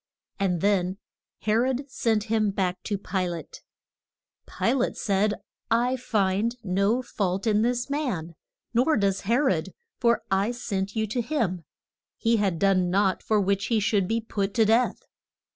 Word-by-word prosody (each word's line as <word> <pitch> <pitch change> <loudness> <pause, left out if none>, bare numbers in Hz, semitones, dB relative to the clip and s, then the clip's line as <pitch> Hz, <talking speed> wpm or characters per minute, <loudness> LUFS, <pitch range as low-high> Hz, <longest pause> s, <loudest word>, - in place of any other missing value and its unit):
And 180 -4 0
then 195 -2 +1 0.4
He 215 - -1
rod 255 +4 +1
sent 225 -5 0
him 215 -1 +1
back 185 -2 -1
to 205 - -1
Pi 190 -1 -2
late. 170 -2 -7 0.9
Pi - - 0
late 260 -2 0
said, 205 -1 +1 0.3
I 240 +3 +2
find 215 -2 0
no 200 +6 +1
fault 195 -4 -2
in 215 -1 +3
this 240 +1 0
man; 250 - -2 0.4
nor 255 +6 +3
does 195 -2 +1
He 225 +4 +1
rod, 275 -1 0 0.2
for 235 -1 +2
I 195 +5 +2
sent 200 -4 -3
you 220 0 +1
to 220 +4 -2
him; 220 - -2 0.5
he 230 0 +2
had 195 -5 +1
done 185 -1 +2
naught 190 +1 +2
for 215 -1 +1
which 200 +1 0
he 230 -2 +2
should 205 -2 +1
be 225 +3 +1
put 200 -3 -3
to 225 - +4
death. 230 +4 +2
210 Hz, 160 wpm, -26 LUFS, 195-235 Hz, 0.9 s, to